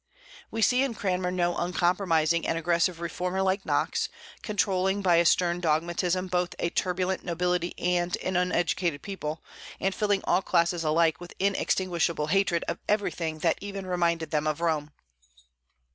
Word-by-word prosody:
We 225 0 -1
see 250 +3 +4
in 270 -4 0
Cranmer 180 -3 -1
no 175 -1 0
uncompromising 175 -2 +1
and 165 - 0
aggressive 170 +1 +1
reformer 180 +2 -2
like 190 +1 0
Knox, - - 0 0.3
controlling 195 -2 0
by 175 -3 +4
a 170 - +4
stern 175 +1 +3
dogmatism 175 +3 0
both 180 -1 -1
a 170 - -1
turbulent 185 +1 -1
nobility 180 0 -1
and 175 0 0
an 185 - -2
uneducated 175 -3 0
people, 160 -6 -5 0.4
and 195 0 0
filling 205 0 +1
all 180 - +2
classes 170 -2 +1
alike 160 0 +2
with 175 - -10
inextinguishable 180 -5 0
hatred 195 -3 +2
of - - -3
everything 175 -6 0
that 165 - +2
even 200 -1 -6
reminded 170 -3 0
them 155 -1 0
of 155 0 -1
Rome. 155 -3 -1
175 Hz, 150 wpm, -27 LUFS, 170-190 Hz, 0.4 s, see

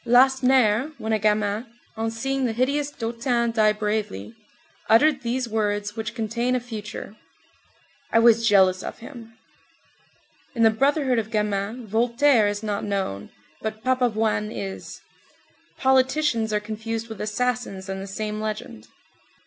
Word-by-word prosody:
Lacenaire, 255 0 +4
when 220 0 -2
a 215 - +2
gamin, 210 +1 +1 0.3
on 225 0 -1
seeing 270 +4 -2
the 225 - -2
hideous 280 +5 0
Dautin 235 -1 -1
die 215 -2 +4
bravely, 210 - -3 0.6
uttered 270 +5 +5
these 250 +1 -2
words 210 -1 -1
which 220 0 -5
contain 235 +2 -1
a - - +1
future: 215 -3 -7 1.0
"I - - +3
was 230 0 +5
jealous 190 -3 +4
of - - -6
him." 230 -2 -12 1.2
In 230 - +2
the 225 - +6
brotherhood 270 +1 +2
of 220 -1 -4
gamins 210 +2 -2
Voltaire 235 +2 +3
is 205 +1 -3
not 205 -2 -2
known, 190 - -3 0.3
but 220 0 -5
Papavoine 225 -4 +1
is. 195 -3 -7 0.8
"Politicians" 260 -3 +2
are 210 - +1
confused 220 +2 -5
with 220 -3 -8
assassins 215 -3 -2
in 190 0 -4
the 195 - -6
same 210 +2 -4
legend. 215 - -5
225 Hz, 135 wpm, -24 LUFS, 210-245 Hz, 1.2 s, the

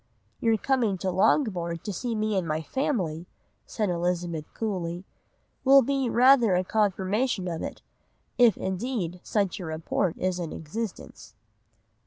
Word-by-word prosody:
"'Your 225 -1 +2
coming 230 -5 +1
to 185 +1 -2
Langbourn 180 - +1
to 205 - -4
see 230 +5 -3
me 215 -1 0
and 185 -3 0
my 155 +1 -1
family,' 175 - -2 0.4
said 210 -5 -1
Elizabeth 175 -2 -2
coolly, 180 -5 -3 0.6
'will 275 0 +7
be 270 0 0
rather 240 -4 +5
a 180 - +2
confirmation 205 +1 0
of 165 -2 -3
it; - - -6 0.5
if, 235 -5 +5
indeed, 190 -2 -3
such 200 -3 -1
a 180 - -5
report 160 +3 -1
is 185 -1 -1
in 170 -3 -4
existence. 205 +7 -7
190 Hz, 140 wpm, -27 LUFS, 175-230 Hz, 0.6 s, will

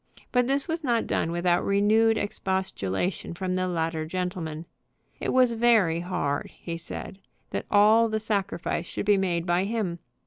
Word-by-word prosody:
But 250 -1 +2
this 275 +3 +1
was 325 -1 -3
not 235 -4 +1
done 165 - -1
without 175 0 +1
renewed 220 +3 +3
expostulation 190 - -2
from 185 +1 -2
the 185 0 0
latter 165 -2 -1
gentleman. 170 -3 -4 0.5
It - - -2
was 255 -2 +4
very 225 -8 +3
hard, 170 -5 -2
he 170 - -5
said, 170 +3 -7 0.3
that - - -3
all 220 +2 +5
the 220 0 -1
sacrifice 195 -5 -2
should - - -4
be 205 -1 +4
made 175 -3 0
by 175 +1 +1
him. 200 -6 -2
190 Hz, 160 wpm, -26 LUFS, 170-220 Hz, 0.5 s, all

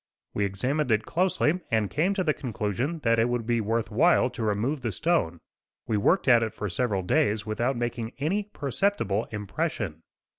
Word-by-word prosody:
We 100 - 0
examined 125 +8 -1
it 110 0 +2
closely 180 -1 +1
and 110 -2 +1
came 175 - 0
to 190 - 0
the 155 -3 +2
conclusion 125 - -3
that 115 -1 +3
it 115 +2 +3
would 120 -2 -1
be 120 0 +1
worth 115 0 -1
while - - +4
to - - -7
remove 110 +7 0
the 115 -3 -2
stone. 155 - 0 0.5
We 110 - -1
worked 155 - +2
at 120 -3 +6
it 110 -2 -2
for 105 - -3
several 100 +1 -1
days 110 -2 +1
without 120 +4 -1
making 120 -1 -3
any 185 +9 -1
perceptible 140 - -1
impression. 105 - -3
120 Hz, 180 wpm, -27 LUFS, 105-150 Hz, 0.5 s, at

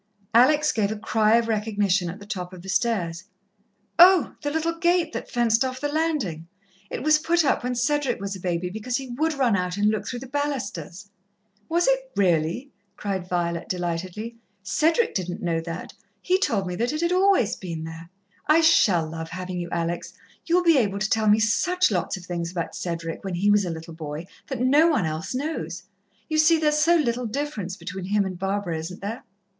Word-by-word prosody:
Alex 295 +6 +5
gave 210 -2 0
a - - -2
cry 215 +1 +3
of 235 -1 0
recognition 205 -4 0
at 180 - -7
the 200 - -11
top 185 -3 -5
of 180 -1 -11
the 190 - -8
stairs. 185 -6 0 0.7
"Oh, 355 -5 +7
the 290 - -1
little 320 +2 -1
gate 345 -1 +2
that - - -5
fenced 235 0 +2
off 255 0 -3
the 290 - -2
landing! 290 - -1 0.4
It - - -5
was 305 0 +4
put 335 +1 +2
up 275 - +1
when 250 0 -1
Cedric 290 +3 0
was 200 0 -4
a - - -8
baby, 180 0 -2
because 220 +5 -2
he 265 -2 -7
would 310 +6 -1
run 250 -6 +3
out 180 0 -2
and 205 +1 +3
look 215 - -3
through 245 -1 -4
the 265 - -8
balusters." 235 -9 -4 0.6
"Was 340 +2 +2
it, 265 0 +1
really?" 180 - +1 0.3
cried 190 -3 -3
Violet 170 -1 -2
delightedly. 185 +6 -4 0.3
"Cedric 330 - +2
didn't 180 -2 -3
know 165 -2 0
that 165 +1 -7 0.3
he 370 +1 +1
told 225 - 0
me 180 - -4
that 235 +3 0
it 305 - -2
had 340 +1 +1
always 370 - +3
been 165 -4 -6
there. 165 +1 -9 0.4
I 310 +2 +5
shall 195 - +4
love 160 0 -6
having 185 +1 -5
you, 175 -1 -4
Alex, 170 0 -3 0.3
you'll 350 +1 +3
be 330 -5 +5
able 200 -4 0
to 210 +1 -1
tell 220 -1 +2
me 210 - +6
such 360 - +2
lots 180 0 -1
of 180 - -11
things 170 -2 -3
about 175 -2 -4
Cedric, 165 -2 -4
when 190 -2 -3
he 200 +4 +2
was 205 -1 +3
a - - -3
little 165 0 -7
boy, 155 0 -6 0.2
that 265 -4 -4
no 285 +6 +5
one 300 - +2
else 160 +8 -3
knows. 195 - -4 0.4
You 310 0 0
see, 320 +2 +5
there's 300 -1 +2
so 335 +3 +4
little 245 -6 0
difference 215 -7 -4
between 190 -2 -6
him 200 +1 +1
and 185 -2 -5
Barbara, 195 -4 -2
isn't 175 +3 -7
there?" 220 +5 -5
210 Hz, 205 wpm, -24 LUFS, 180-285 Hz, 0.7 s, Oh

